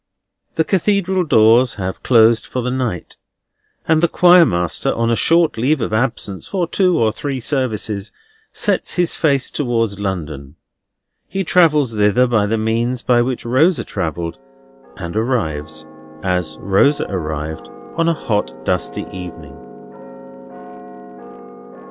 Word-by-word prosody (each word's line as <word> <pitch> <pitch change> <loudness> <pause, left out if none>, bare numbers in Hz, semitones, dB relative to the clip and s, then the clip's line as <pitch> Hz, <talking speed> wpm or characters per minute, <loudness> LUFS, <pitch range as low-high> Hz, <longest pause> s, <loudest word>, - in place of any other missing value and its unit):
The 160 - +2
Cathedral 190 0 +1
doors 115 -3 +4
have 95 -2 -5
closed 115 -2 +4
for 125 - -3
the 125 - -2
night; 125 -9 -3 0.7
and 160 -1 +3
the 170 - +4
Choir 175 -1 +6
master, 85 -1 -1
on 115 0 0
a - - +2
short 165 -1 +2
leave 140 +5 +1
of 115 -2 -3
absence 110 -4 -2
for 185 -3 -1
two 180 0 +2
or 110 -2 +2
three 135 +3 -4
services, 110 -6 -2 0.4
sets - - -1
his 175 -1 0
face 140 -4 +1
towards 115 -7 -1
London. 75 -8 -5 0.7
He 195 0 -3
travels 150 -8 +3
thither 105 +3 +3
by 110 -4 +1
the 115 +2 0
means 115 +3 -1
by 120 -1 +3
which 125 0 -3
Rosa 130 +3 +2
travelled, 85 - -4 0.6
and 85 0 -6
arrives, 80 - -2 0.4
as 90 -4 -2
Rosa 100 +10 +2
arrived, 80 -2 -5 0.3
on 165 0 +1
a - - +2
hot, 105 -8 -2
dusty - - -2
evening. 80 -6 -9
115 Hz, 130 wpm, -18 LUFS, 95-145 Hz, 0.7 s, Choir